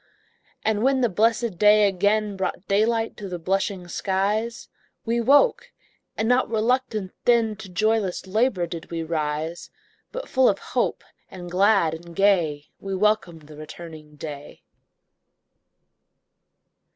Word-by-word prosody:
And 215 -1 +1
when 265 +1 +2
the 240 - +3
blessed 220 0 +1
dawn 210 0 +6
again 205 +2 +1
Brought 190 0 -4
daylight 225 +3 +1
to 200 -2 -7
the 180 - -4
blushing 190 +1 -2
skies, 205 +6 -1 0.4
We 235 +1 0
woke, 285 - +3 0.5
and 220 - 0
not 250 +2 +2
RELUCTANT 225 -3 0
then, 230 -3 +3
To 215 -3 -10
joyless 210 0 0
LABOUR 200 -2 +1
did 165 -1 -8
we 165 -1 -3
rise; 160 +1 -3 0.4
But - - -6
full 260 -1 +4
of 200 - 0
hope, - - -2 0.3
and 175 -1 -9
glad 195 -3 +3
and 170 +1 -10
gay, 170 -7 +1
We 195 -1 -4
welcomed 190 -5 0
the 150 +1 -13
returning 155 -1 -10
day. 145 -1 -9
200 Hz, 130 wpm, -24 LUFS, 170-220 Hz, 0.5 s, dawn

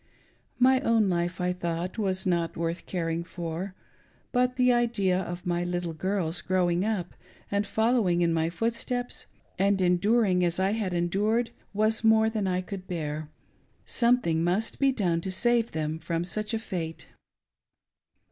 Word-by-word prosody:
My 260 +1 +5
own 225 -6 +3
life, 175 0 -1
I 180 0 +1
thought, 175 +2 -3
was 190 -3 -1
not 170 -3 0
worth 170 +1 -3
caring 165 -2 -2
for, 175 +2 -5 0.6
but 250 0 +2
the 250 -1 +4
idea 215 -6 +2
of 175 0 -5
my 175 0 0
little 175 -1 -2
girls 175 -1 -1
growing 180 0 +1
up' 205 -5 -2 0.4
and 200 0 0
following 220 -5 +2
in 170 -1 +2
my 165 0 +1
footsteps 235 +6 -3 0.3
and 200 0 +3
enduring 185 +1 +3
as 175 +1 +1
I 190 +1 +2
had 210 -4 -1
endtii^, 205 +7 +1 0.3
wias' 215 +2 +2
more 220 0 +5
than 210 -3 -1
I 180 0 0
could 185 0 -7
bear. 155 -3 -4 0.6
Something 235 -10 +2
must 190 +6 0
be 275 -1 +4
doirte' 180 -9 0
to 190 - -4
save 235 +4 +2
them 155 0 -2
from 165 0 -2
such 215 +5 -2
a - - -1
fate. 170 -7 -5
185 Hz, 155 wpm, -27 LUFS, 170-220 Hz, 0.6 s, My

